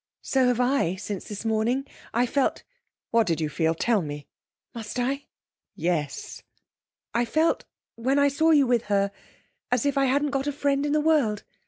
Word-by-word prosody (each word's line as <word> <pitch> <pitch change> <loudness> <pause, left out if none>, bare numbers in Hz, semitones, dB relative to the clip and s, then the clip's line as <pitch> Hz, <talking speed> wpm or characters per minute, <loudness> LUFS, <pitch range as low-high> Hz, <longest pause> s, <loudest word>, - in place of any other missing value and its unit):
'So 260 -2 +2
have 245 -1 +1
I, 250 -8 +2
since 195 0 -5
this 210 +1 -7
morning. 225 +5 +1 0.3
I 240 +2 +2
felt 270 +2 0 0.2
' - - -57
'What 230 -1 +3
did 165 -2 +1
you 155 -2 -1
feel? 160 +2 0
Tell 220 +4 +2
me!' 145 -2 -6 0.5
'Must 230 +1 -5
I?' 275 +3 -1 0.5
'Yes!' 160 -4 -2 0.7
'I 240 +1 +2
felt, 315 +7 +1 0.3
when 260 +4 0
I 285 0 +5
saw 300 +4 +2
you 295 -4 +6
with 240 -2 +1
her, 200 -1 +1 0.6
as 250 0 +1
if 280 -1 +2
I 275 - +3
hadn't 285 +2 +1
got 275 0 -1
a - - +1
friend 285 0 0
in 290 - 0
the 305 - +3
world. 285 -10 +2
245 Hz, 185 wpm, -26 LUFS, 205-280 Hz, 0.7 s, you